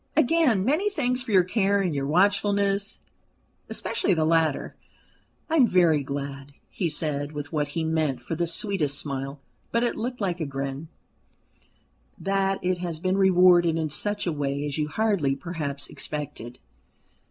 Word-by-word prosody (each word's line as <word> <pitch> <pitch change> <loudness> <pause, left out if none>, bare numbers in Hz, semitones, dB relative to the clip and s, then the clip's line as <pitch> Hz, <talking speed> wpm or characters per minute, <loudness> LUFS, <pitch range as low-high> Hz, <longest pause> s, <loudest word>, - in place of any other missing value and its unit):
"Again, 290 - +3
many 315 - +2
thanks 250 -9 0
for 245 -2 -6
your 185 -3 +6
care 200 +1 +1
and 185 -5 0
your 140 -1 -2
watchfulness 200 +3 +1 0.7
especially 195 - 0
the 160 -1 +1
latter. 160 -3 +1 0.7
I 325 - +1
am 255 -5 +6
very 170 -6 +4
glad," 140 0 -6 0.2
he 175 -4 -1
said, 150 -1 -2
with 145 +1 -6
what 150 -1 0
he 165 - +1
meant 160 -5 0
for 120 - -6
the 170 +1 -1
sweetest 165 -5 0
smile, 135 0 -4 0.3
but 235 +1 +1
it 240 - 0
looked 245 +2 -4
like 180 -4 -1
a 160 - -1
grin, 135 +2 -5 1.3
"that 195 0 0
it 180 0 0
has 170 -3 -3
been 185 +2 0
rewarded 180 -3 +5
in 160 -2 -2
such 205 +7 0
a 175 - 0
way 140 0 -2
as 145 +1 -3
you 150 - 0
hardly 170 -5 +1
perhaps 145 -2 -4
expected." 125 -5 -5
170 Hz, 160 wpm, -25 LUFS, 145-200 Hz, 1.3 s, your